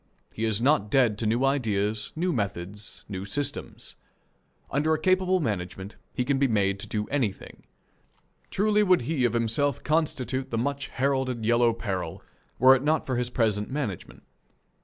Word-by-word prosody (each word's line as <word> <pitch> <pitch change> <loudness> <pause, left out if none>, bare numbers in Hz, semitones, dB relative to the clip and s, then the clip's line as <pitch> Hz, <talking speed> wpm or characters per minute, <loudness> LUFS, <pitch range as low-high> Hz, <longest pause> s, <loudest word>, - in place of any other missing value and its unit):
He 110 - -2
is 110 0 0
not 130 -7 +3
dead 115 -4 +3
to 115 - 0
new 120 +5 +2
ideas, 110 -6 0
new 175 +2 0
methods, 100 -2 -5
new 95 -2 -5
systems. 145 +8 -3 0.8
Under 155 +3 +2
a - - -4
capable 185 +1 +2
management 100 - -4 0.2
he 125 - -2
can 135 0 +1
be 140 - +3
made 100 -4 +1
to - - -6
do 105 -1 -2
anything. 120 -9 -3 0.8
Truly 210 +1 +2
would 185 -6 +4
he 130 0 0
of 120 - +1
himself 120 +4 0
constitute 140 -4 -1
the 115 - -2
much 140 +3 -2
heralded 130 -3 -1
Yellow 120 +1 +4
Peril 95 -5 -4 0.3
were 130 +2 +7
it 130 - -1
not 155 +3 +1
for 130 - -2
his 120 0 -1
present 110 -4 0
management. 130 - -5
125 Hz, 160 wpm, -26 LUFS, 105-145 Hz, 0.8 s, were